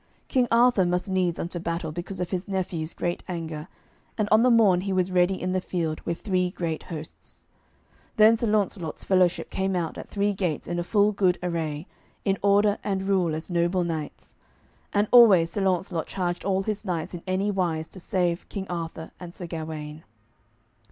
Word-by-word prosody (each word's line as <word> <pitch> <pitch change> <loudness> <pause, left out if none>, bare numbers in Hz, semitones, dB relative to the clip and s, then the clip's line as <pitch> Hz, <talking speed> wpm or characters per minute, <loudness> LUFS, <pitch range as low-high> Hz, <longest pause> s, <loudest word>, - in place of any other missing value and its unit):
King 250 -2 +2
Arthur 235 -3 +4
must 180 +2 -1
needs 180 -3 +1
unto 175 +1 -3
battle 165 -1 -3
because 175 +3 -6
of 180 -1 -3
his 185 -1 -2
nephew's 180 -4 -2
great 175 0 -2
anger, 165 -3 -5 0.5
and 215 -2 +1
on 215 +1 +6
the 250 - +5
morn 210 -7 +5
he 195 +1 -3
was 185 -1 +1
ready 180 +1 +2
in 185 - -2
the 185 0 0
field 165 -4 -2
with 170 - -3
three 185 -3 +1
great 170 -3 -3
hosts. 155 -2 -10 0.7
Then 220 +1 +7
Sir 230 +1 -1
Launcelot's 200 -6 -1
fellowship 185 -2 +2
came 190 0 -1
out 170 -3 -2
at - - -9
three 205 0 0
gates 180 -6 -2
in 175 +1 -2
a - - -1
full 205 +3 +3
good 190 -3 +2
array, 160 -3 -2 0.4
in 195 -1 +1
order 205 +1 +3
and 195 -2 -1
rule 185 -5 +1
as 160 +4 -6
noble 175 +1 +1
knights. 160 -4 -5 0.6
And 205 +1 +2
always 200 -9 +7
Sir 205 - -2
Launcelot 185 -3 0
charged 175 -2 -2
all 195 -1 +1
his 210 0 -3
knights 180 -2 -3
in 175 - -6
any 190 +2 0
wise 170 -5 -1
to 190 - -11
save 175 -1 -1
King 195 -2 -4
Arthur 165 -2 -5
and 175 -1 -9
Sir 180 - -6
Gawaine. 155 -2 -6
180 Hz, 185 wpm, -26 LUFS, 170-195 Hz, 0.7 s, Then